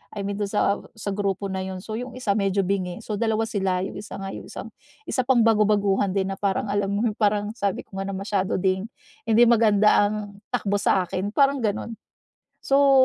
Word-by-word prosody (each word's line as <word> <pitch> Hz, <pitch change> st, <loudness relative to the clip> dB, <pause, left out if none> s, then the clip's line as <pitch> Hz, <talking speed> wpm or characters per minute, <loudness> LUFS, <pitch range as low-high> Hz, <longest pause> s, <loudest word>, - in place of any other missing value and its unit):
I 205 Hz, -, -3 dB
mean 200 Hz, 0 st, -3 dB
do'n 205 Hz, -, 0 dB
sa 205 Hz, -1 st, +2 dB, 0.2 s
sa 220 Hz, -2 st, -5 dB
grupo 200 Hz, -1 st, -1 dB
na 190 Hz, 0 st, -3 dB
'yon. 190 Hz, -1 st, -5 dB
So 215 Hz, -, -5 dB
'yong 250 Hz, +1 st, -6 dB
isa, 210 Hz, -6 st, 0 dB
medyo 195 Hz, -1 st, +1 dB
bingi. 185 Hz, -1 st, -2 dB
So 210 Hz, -, -3 dB
dalawa 225 Hz, -1 st, +1 dB
sila, 190 Hz, -4 st, 0 dB
'yong 195 Hz, -, -5 dB
isa 205 Hz, -, -8 dB
nga 195 Hz, -, -4 dB
'yong -, -, -8 dB
isang -, -, -8 dB, 0.4 s
isa 255 Hz, -, +1 dB
pang 260 Hz, -3 st, +5 dB
bago-baguhan 205 Hz, -3 st, +3 dB
din 195 Hz, -1 st, 0 dB
na 195 Hz, -, -5 dB
parang 200 Hz, +1 st, 0 dB
alam 205 Hz, -1 st, 0 dB
mo, 205 Hz, +3 st, 0 dB
parang 205 Hz, -1 st, +1 dB
sabi 200 Hz, -3 st, -1 dB
ko 195 Hz, -, -12 dB
nga 195 Hz, -, -2 dB
na -, -, -3 dB
masyado 195 Hz, -1 st, -1 dB
ding, 190 Hz, +1 st, +1 dB, 0.4 s
hindi 225 Hz, +1 st, +6 dB
maganda 215 Hz, -3 st, +5 dB
ang 205 Hz, -1 st, -5 dB, 0.2 s
takbo 205 Hz, -4 st, 0 dB
sa'kin, 190 Hz, +1 st, 0 dB
parang 280 Hz, +1 st, +3 dB
gano'n. 215 Hz, +2 st, -2 dB, 0.7 s
So 275 Hz, -1 st, +5 dB
205 Hz, 200 wpm, -24 LUFS, 195-220 Hz, 0.7 s, hindi